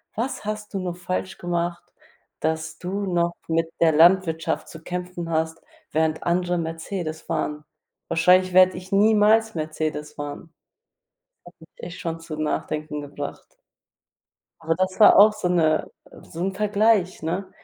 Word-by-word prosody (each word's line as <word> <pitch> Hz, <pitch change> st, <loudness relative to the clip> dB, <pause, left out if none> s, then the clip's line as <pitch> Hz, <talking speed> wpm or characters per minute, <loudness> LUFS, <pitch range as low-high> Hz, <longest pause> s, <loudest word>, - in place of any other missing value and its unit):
„Was 235 Hz, +2 st, -3 dB
hast 210 Hz, 0 st, -5 dB
du 195 Hz, -, -1 dB
nur 180 Hz, -2 st, -4 dB
falsch 185 Hz, +1 st, -4 dB
gemacht, 175 Hz, 0 st, -3 dB, 0.5 s
dass 160 Hz, 0 st, -2 dB
du 195 Hz, +3 st, -3 dB
noch 170 Hz, 0 st, +1 dB
mit 165 Hz, 0 st, +1 dB
der 165 Hz, -, +6 dB
Landwirtschaft 165 Hz, 0 st, +3 dB
zu 160 Hz, 0 st, -11 dB
kämpfen 180 Hz, -1 st, -5 dB
hast, 160 Hz, 0 st, -1 dB, 0.3 s
während 160 Hz, 0 st, 0 dB
andere 175 Hz, +1 st, 0 dB
Mercedes 165 Hz, 0 st, -4 dB
fahren? 150 Hz, 0 st, -3 dB, 0.4 s
Wahrscheinlich 180 Hz, +2 st, +4 dB
werde 185 Hz, 0 st, +6 dB
ich 185 Hz, +2 st, -10 dB
niemals 215 Hz, +2 st, +4 dB
Mercedes 155 Hz, -1 st, -3 dB
fahren.“ 145 Hz, +3 st, -8 dB, 0.9 s
Das 175 Hz, -, -14 dB
hat -, -, -49 dB
mich 160 Hz, -, -15 dB
echt 180 Hz, -, -7 dB
schon 165 Hz, -1 st, -4 dB
zum 155 Hz, -2 st, -5 dB
Nachdenken 150 Hz, 0 st, -3 dB
gebracht. 145 Hz, 0 st, -8 dB, 1.0 s
Aber 165 Hz, 0 st, 0 dB
das 185 Hz, +3 st, -1 dB
war 210 Hz, -, +8 dB
auch 210 Hz, +1 st, +8 dB
so 210 Hz, -4 st, -2 dB
'ne 160 Hz, -3 st, +2 dB, 0.3 s
so 165 Hz, -, -10 dB
'n 195 Hz, -, -1 dB
Vergleich, 210 Hz, -3 st, +2 dB
ne? 180 Hz, +4 st, -3 dB
170 Hz, 145 wpm, -24 LUFS, 160-185 Hz, 1.0 s, war